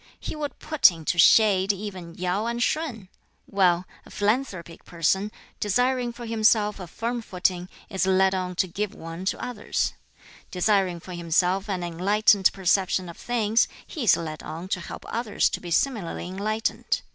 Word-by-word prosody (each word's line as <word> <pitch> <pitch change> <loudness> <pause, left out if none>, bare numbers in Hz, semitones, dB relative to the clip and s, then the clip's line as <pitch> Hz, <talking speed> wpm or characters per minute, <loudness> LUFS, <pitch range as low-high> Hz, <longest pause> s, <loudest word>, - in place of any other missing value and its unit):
He - - -5
would 295 -2 -5
put 310 -7 +5
into 165 0 -3
shade 195 0 +6
even 190 -4 -7
Yau 185 +5 -1
and 235 0 -1
Shun! 255 - -2 0.4
Well, 185 -2 +2 0.2
a - - -16
philanthropic 205 -6 -2
person, 190 +5 0 0.3
desiring 245 +3 +1
for 235 0 -9
himself 215 -2 +2
a 180 - -7
firm 235 +7 -3
footing, 180 -3 -1 0.2
is 190 -2 -1
led 190 0 +4
on 180 -1 -2
to 185 - +1
give 205 +4 -4
one 165 +3 -7
to - - -1
others; 240 -4 -2 0.6
desiring 185 -2 +1
for 180 - -9
himself 180 +4 +1
an 185 -3 -2
enlightened 190 +3 +3
perception 185 -1 +1
of 170 - -10
things, 230 -2 +1 0.2
he 295 -8 -5
is 210 - +6
led 155 -2 -5
on 170 +4 -7
to 185 - 0
help 170 - -8
others 230 -2 0
to - - -4
be 175 - -7
similarly 195 -2 -1
enlightened. 210 +4 -2
195 Hz, 160 wpm, -25 LUFS, 180-220 Hz, 0.6 s, shade